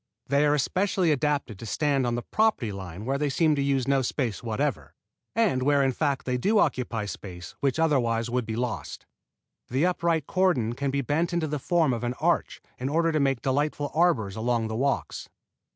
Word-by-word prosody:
They 140 +2 +2
are 145 - +3
especially 185 +3 +1
adapted 145 -7 -1
to - - -7
stand 140 +1 +1
on 120 - 0
the 120 - -3
property 215 - +1
line 95 0 -7
where 135 +2 -1
they 145 -1 0
seem 155 +3 +3
to 140 - 0
use 135 -2 +1
no 135 -1 +3
space 120 -3 -2
whatever, 110 -3 -2 0.4
and 210 - +2
where 140 +1 +3
in 135 - +2
fact 140 0 -1
they 125 -1 -1
do 210 - +2
occupy 125 - 0
space 90 -4 -8
which 140 0 0
otherwise 120 -8 +1
would 120 -1 -2
be 110 - -3
lost. 120 -1 -4 0.6
The 135 +7 +1
upright 170 -4 +1
cordon 165 -13 +1
can 140 +3 -2
be 140 +1 0
bent 160 +7 0
into 170 -2 +1
the 150 -1 -3
form 160 -2 +2
of 120 0 -4
an 120 +1 -2
arch - - 0 0.2
in 130 +2 -2
order 165 +2 +2
to 155 - +1
make 135 -3 +1
delightful 145 +1 0
arbors 145 - +2
along 115 0 0
the 110 - -3
walks. 135 +4 -2
135 Hz, 200 wpm, -26 LUFS, 120-155 Hz, 0.6 s, are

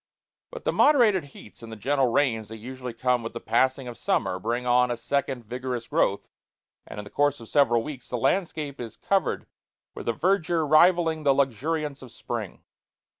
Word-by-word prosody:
But - - -9
the - - 0
moderated 225 - +4
heats 105 -8 -14
and 115 -1 -10
the - - -6
gentle 135 +4 +1
rains 115 -4 +1
that 110 - -8
usually 125 +1 -7
come 125 +1 +1
with 115 - -6
the 115 - -5
passing 130 +3 +1
of 120 -4 -8
summer 90 - 0
bring 120 +5 -2
on 125 0 +3
a 120 - -2
second 125 +1 -2
vigorous 125 0 -4
growth, 100 - 0 0.6
and - - -8
in - - -5
the 100 - -12
course 145 -1 +1
of 115 - -11
several 120 -5 +3
weeks 135 -3 -8
the 125 - -2
landscape 150 +1 -1
is 115 -2 -8
covered 195 -1 0 0.5
with - - -5
a - - +2
verdure 170 - +1
rivalling 160 +1 +4
the 140 -2 +3
luxuriance 140 +3 -1
of 130 -3 -11
spring. - - -6
130 Hz, 185 wpm, -26 LUFS, 115-150 Hz, 0.6 s, moderated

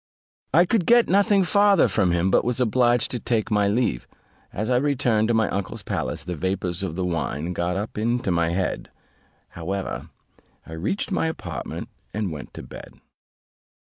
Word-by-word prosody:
I 170 +5 +5
could 190 -1 +1
get 240 0 +6
nothing 200 0 +4
farther 200 0 +4
from 100 -5 +1
him, 85 +2 +1
but - - +4
was 125 0 -1
obliged 120 -1 +2
to 125 - -2
take 115 0 -1
my 105 -1 +3
leave. 105 - 0 0.4
As 110 +2 -3
I 125 - +4
returned 125 -5 +2
to 120 - +2
my 110 -2 +3
uncle's 100 -1 -4
palace, - - -3
the 90 -1 -4
vapours 95 +1 -2
of 95 -5 -3
the 95 0 -1
wine 85 -1 -2
got 90 +1 -1
up 105 +1 -4
into 115 -2 0
my 85 -1 +2
head; 90 +2 -2 0.6
however, 95 +3 -4 0.6
I 80 - -10
reached 100 - -2
my 175 - +1
apartment, 90 - -5 0.3
and 105 -4 -1
went 75 -3 -8
to - - -7
bed. - - -11
105 Hz, 175 wpm, -24 LUFS, 90-125 Hz, 0.6 s, get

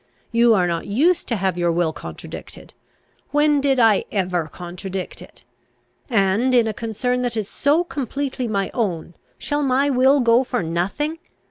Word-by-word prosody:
You 235 -1 +5
are 185 -3 +2
not 170 +1 -2
used 305 - +2
to 235 - 0
have 190 -3 -1
your 175 -1 +2
will 165 -1 0
contradicted! - - -10 0.6
When 295 -1 +3
did 270 -2 +2
I 225 -4 +4
ever 180 -5 -1
contradict 180 +3 -7
it? - - -15 0.7
And, 225 +3 +2
in 240 -2 +5
a 220 - -2
concern 235 +3 -2
that 240 -2 -2
is 210 -3 -2
so 295 +10 +1
completely 275 -4 -3
my 200 -3 -1
own, 175 -8 -2 0.2
shall 290 0 -2
my 275 +1 +2
will 265 +2 +4
go 235 0 +4
for 245 -5 -2
nothing? 195 - -2
230 Hz, 160 wpm, -21 LUFS, 190-265 Hz, 0.7 s, You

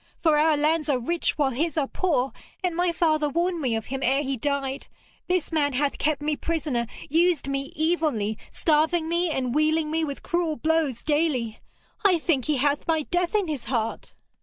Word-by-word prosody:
For 320 -3 +5
our 310 0 +4
lands 310 +1 +1
are 275 - +3
rich 330 +9 -1
while 280 -3 +2
his 310 +5 -1
are 295 - +2
poor, 270 -5 0 0.3
and 355 -2 0
my 350 0 +2
father 310 -3 +1
warned 340 +3 0
me 250 -5 0
of 225 -1 -3
him 270 +1 -4
ere 270 +3 +2
he 270 -1 -1
died. 275 +1 -2 0.4
This 360 -3 0
man 290 -3 +1
hath 280 +2 0
kept 295 -1 0
me 300 0 0
prisoner, 290 -8 -2 0.2
used 330 0 +2
me 275 0 -3
evilly, 300 -11 0
starving 320 +1 +1
me 340 +1 +1
and 255 -5 -1
wealing 310 +1 +2
me 320 +1 0
with 280 -3 -4
cruel 340 -3 0
blows 315 -6 0
daily. 290 -8 0 0.4
I 380 -4 +5
think 305 -6 0
he 300 -2 +1
hath 285 +2 0
my 320 -2 +2
death 355 +4 -1
in 405 -4 +2
his 290 -7 -4
heart.' 230 -3 -3
305 Hz, 190 wpm, -25 LUFS, 275-330 Hz, 0.4 s, For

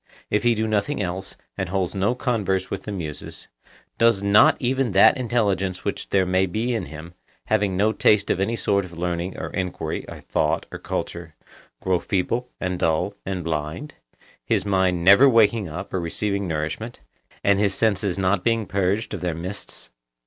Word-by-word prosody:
if 105 - +2
he 120 -1 +3
do 110 0 -1
nothing 110 +7 0
else, 95 -1 -4 0.2
and 95 - -2
holds 95 -1 -1
no 100 +5 +1
converse 100 -7 -1
with 100 - -4
the 105 - -4
Muses, 80 -7 -6 0.5
does 115 -4 +4
not 100 +1 +6
even 130 -3 0
that 95 - +7
intelligence 100 -7 -1
which - - -3
there 95 -1 +3
may 95 +1 +2
be 110 +7 -1
in 115 - -2
him, 80 +3 -10 0.3
having 105 -3 +1
no 105 +3 +3
taste 105 -2 +3
of - - 0
any 110 +4 0
sort 100 -3 +1
of 85 -2 -11
learning 90 +1 -3
or - - -5
enquiry 90 -4 -3
or - - -8
thought - - 0
or - - -7
culture, 85 -2 -5 0.5
grow 95 -2 +2
feeble 115 +8 -1
and 90 -1 -2
dull 80 +5 +1
and 95 -2 -3
blind, 80 - -4 0.5
his - - 0
mind 95 -3 +1
never 100 +9 +8
waking 115 -4 +3
up 90 +6 -7
or 95 - 0
receiving 100 +3 -2
nourishment, 80 +9 -4 0.4
and 100 -1 +3
his 100 -1 +1
senses 100 -4 +1
not 95 -1 +1
being 115 -2 +1
purged 100 +3 -1
of - - -4
their 90 -2 -2
mists? 90 +5 -6
95 Hz, 180 wpm, -23 LUFS, 90-110 Hz, 0.5 s, never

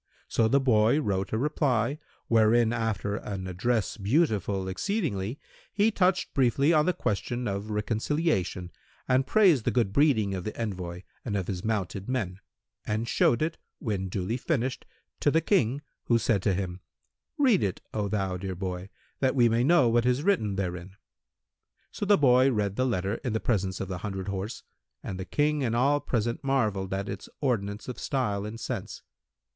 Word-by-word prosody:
So 115 - +2
the 140 +5 +4
boy 120 0 +3
wrote 95 -8 -1
a 110 - 0
reply, 135 -1 0 0.3
wherein, 115 +1 +4
after 110 -3 -1
an 95 -4 -5
address[FN#180] 105 +4 -1
beautiful 100 - +1
exceedingly, 125 - -2 0.3
he 215 +2 +3
touched 185 -2 +1
briefly 135 +4 +3
on 150 0 +3
the - - +5
question 120 - -2
of 100 +1 -3
reconciliation 105 - -1 0.4
and 130 +1 +2
praised 185 - +5
the - - +1
good 115 -6 +1
breeding 110 -9 +3
of 95 -2 -3
the 110 - -6
envoy 90 -5 -4 0.2
and 105 -4 -2
of 95 - -2
his 90 -2 -4
mounted 100 -1 -2
men, 100 -8 -2 0.4
and 110 +2 -2
showed 120 +3 +3
it, 160 +1 -3 0.2
when 100 -7 -3
duly 95 +5 -2
finished, 130 -2 -2 0.3
to - - +3
the 160 - +3
King 145 - +1 0.2
who 120 - +3
said 105 -3 +1
to 95 -1 +1
him, 90 -1 -3 0.6
"Read 255 -9 +4
it, 95 -3 -1
O 105 -2 -1
thou 95 -3 -1
dear 95 0 -4
boy, 90 +1 -5 0.3
that 130 0 +1
we 120 -3 +5
may 115 +2 +2
know 145 -2 +5
what 120 +1 +2
is 125 +3 +1
written[FN#181] 160 - +1
therein." 90 0 -4 1.0
So 205 - -4
the 205 0 +6
boy 130 -1 +5
read 105 -4 -1
the 130 +3 +1
letter 100 -2 -1
in 125 - -1
the 110 - 0
presence 95 -6 -1
of 95 - -3
the 90 -1 -4
hundred 95 0 -4
horse, 100 +4 -4 0.4
and 95 - -5
the 95 - -4
King 150 +2 +1
and 115 -2 0
all 140 +4 +3
present 120 -2 -2
marvelled 110 -9 0
at 95 +1 -2
its 95 0 -6
ordinance 105 -6 -1
of 125 - -6
style 105 -8 -1
and 110 +2 -7
sense. - - -5
110 Hz, 175 wpm, -28 LUFS, 100-135 Hz, 1.0 s, the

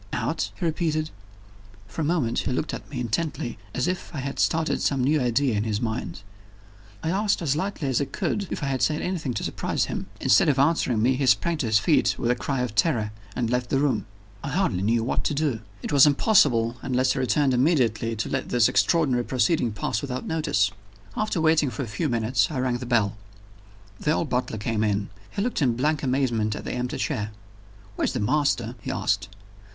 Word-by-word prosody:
"Out?" - - -1
he 180 - -1
repeated. 155 -1 -1 0.8
For 100 +9 -5
a - - 0
moment 145 -8 +1
he - - -2
looked 140 +5 -2
at - - -7
me 140 -4 -5
intently, 120 0 -2 0.2
as 125 - 0
if 185 0 -3
I - - -3
had 135 0 -4
started 160 0 +1
some 135 -3 +1
new 150 +3 +2
idea 125 0 +1
in 105 - 0
his 110 -2 -1
mind. 110 -5 -4 0.8
I 160 - 0
asked 205 +2 +1
as 145 -5 0
lightly 175 -3 -2
as 130 -1 +1
I - - +1
could 200 +7 -2
if - - -4
I - - 0
had 135 -2 -1
said 155 0 +1
anything 160 -9 -2
to - - -2
surprise - - -1
him. - - -5
Instead - - +4
of 140 - +2
answering 135 -6 +2
me, 130 +2 +3
he 135 -1 0
sprang 145 +9 +3
to 130 - -1
his 110 -1 +4
feet 105 - +3
with 120 - +1
a - - +2
cry 135 +1 -2
of 125 -4 -2
terror, 110 -4 +1 0.2
and 120 -2 -1
left 125 0 0
the - - +2
room. 140 -5 0 0.4
I 140 - -3
hardly 180 - 0
knew 115 +3 +2
what 120 - -1
to 150 - 0
do. 140 -6 0 0.2
It - - -3
was 140 +1 +8
impossible, 130 - +3
unless 130 0 +1
he - - -3
returned 130 +2 +2
immediately 120 -5 +2
to 110 - -2
let - - -2
this 120 -2 +4
extraordinary 140 -8 +2
proceeding 130 0 +1
pass 105 +1 -2
without 130 -2 -4
notice. 110 -11 +1 0.4
After 215 -4 -1
waiting 160 -3 +3
for 120 +3 -4
a - - -6
few 110 +9 -2
minutes 120 +6 +1
I 150 - -4
rang 125 -1 0
the 125 - -6
bell. 110 -5 +1 0.8
The 150 - +1
old 160 - -1
butler 125 -3 -1
came 110 +1 -1
in. 100 -1 0 0.2
He 200 - -2
looked 245 -7 -1
in 125 -5 +2
blank 150 +5 0
amazement 125 -6 0
at - - -6
the - - -3
empty 125 0 -3
chair. 105 0 -2 0.7
"Where's - - 0
the 125 - -2
master?" 120 0 +1
he - - -6
asked. - - -1
130 Hz, 210 wpm, -25 LUFS, 115-150 Hz, 0.8 s, was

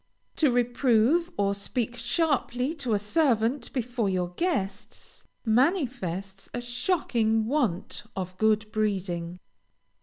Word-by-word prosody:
To 300 -5 +4
reprove 245 +6 +3
or 200 -1 +2
speak 235 +4 -2
sharply 250 +1 0
to 260 -9 -1
a - - +3
servant 235 +2 +1
before 240 -4 -1
your 180 -2 0
guests, 200 - -3 0.2
manifests 225 - 0
a - - -1
shocking 240 - +1
want 230 - -1
of 185 -1 -4
good 215 0 +2
breeding. 185 -5 -1
230 Hz, 110 wpm, -27 LUFS, 200-260 Hz, 0.2 s, To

